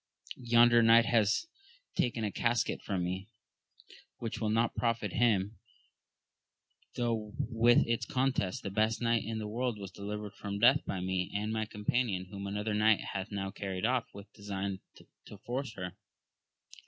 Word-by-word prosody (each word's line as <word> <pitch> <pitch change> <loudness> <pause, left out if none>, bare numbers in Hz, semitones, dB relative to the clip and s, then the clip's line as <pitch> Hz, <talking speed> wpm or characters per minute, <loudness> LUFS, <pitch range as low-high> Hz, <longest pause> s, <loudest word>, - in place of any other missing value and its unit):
Yonder 120 -1 +5
knight 115 0 +6
hath 110 - +2 0.5
taken 120 -2 0
a 105 - -1
casket 115 +1 0
from 95 -3 -2
me, 95 +3 -4 0.9
which 115 -1 -5
will 110 - +1
not 115 +2 +2
profit 115 -5 -1
him, 110 -3 +1 1.4
though 115 -3 -1
with 120 +1 +3
its 115 0 -1
contents 130 -8 0
the 100 - -5
best 110 +2 +1
knight 115 -1 +1
in 110 +1 -4
the 110 -1 -4
world 120 +1 -2
was 100 -2 -7
delivered 105 0 -6
from 100 -1 -5
death 125 +7 +5
by 95 - -2
me 95 0 -1
and 105 +2 -1
my 110 -1 -1
companion, 105 -2 -1
whom 100 -1 -6
another 105 +2 -2
knight 105 0 +4
hath 95 +1 -4
now 95 -1 -3
carried 95 -2 -3
off 125 0 +1
with 100 +1 -12
design 100 -2 -4 0.5
to 105 - -10
force 120 +3 -4
her. 90 -1 -5
110 Hz, 155 wpm, -31 LUFS, 100-115 Hz, 1.4 s, knight